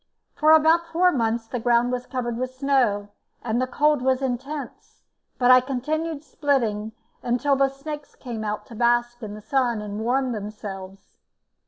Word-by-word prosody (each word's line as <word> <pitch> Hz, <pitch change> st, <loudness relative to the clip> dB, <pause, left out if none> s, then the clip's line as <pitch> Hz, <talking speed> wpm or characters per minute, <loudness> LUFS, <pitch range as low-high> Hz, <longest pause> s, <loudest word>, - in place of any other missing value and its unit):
For 305 Hz, -, +2 dB
about 320 Hz, +2 st, +5 dB
four 350 Hz, +2 st, +3 dB
months 230 Hz, -4 st, 0 dB
the 245 Hz, +2 st, -4 dB
ground 240 Hz, +1 st, +2 dB
was 250 Hz, 0 st, -3 dB
covered 240 Hz, -2 st, -3 dB
with 255 Hz, +2 st, -4 dB
snow, 255 Hz, -7 st, +1 dB, 0.3 s
and 240 Hz, +1 st, 0 dB
the 255 Hz, -, 0 dB
cold 295 Hz, +2 st, +2 dB
was 260 Hz, 0 st, +2 dB
intense, 265 Hz, +2 st, -5 dB, 0.3 s
but 250 Hz, 0 st, +5 dB
I 255 Hz, 0 st, +8 dB
continued 300 Hz, +4 st, -3 dB
splitting 225 Hz, -9 st, -1 dB, 0.3 s
until 250 Hz, +4 st, +1 dB
the 270 Hz, 0 st, +3 dB
snakes 290 Hz, +2 st, -8 dB
came 235 Hz, -4 st, -6 dB
out 210 Hz, 0 st, -3 dB
to -, -, -13 dB
bask 240 Hz, +1 st, +1 dB
in 210 Hz, -2 st, -6 dB
the 215 Hz, -, -10 dB
sun 240 Hz, 0 st, 0 dB
and 210 Hz, 0 st, -5 dB
warm 255 Hz, +3 st, 0 dB
themselves. 200 Hz, -3 st, -8 dB
250 Hz, 165 wpm, -24 LUFS, 225-275 Hz, 0.3 s, I